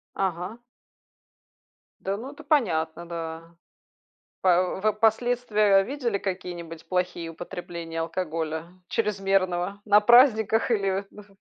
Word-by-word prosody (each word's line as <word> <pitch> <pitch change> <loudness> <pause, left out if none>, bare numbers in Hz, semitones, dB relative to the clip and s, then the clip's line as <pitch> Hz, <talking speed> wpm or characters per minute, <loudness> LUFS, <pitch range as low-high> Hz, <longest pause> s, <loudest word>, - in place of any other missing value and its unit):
Ага. 190 +3 -2 1.4
Да, 195 +1 -2
ну 255 +6 -7
это - - -13
понятно, 170 - +1
да. 165 0 -7 0.9
А 180 -1 +5 0.2
в - - -10
в - - -16
вы 215 - +3
последствия 215 -2 +3
видели 245 -3 -2
какие-нибудь 175 -4 -6
плохие 180 -2 -2
употребления 165 0 -6
алкоголя 165 -1 -3 0.2
чрезмерного 195 -3 0
на 210 0 +6
праздниках 225 -1 +5
или 195 -2 0
мх 210 -1 -13
195 Hz, 110 wpm, -26 LUFS, 170-215 Hz, 1.4 s, на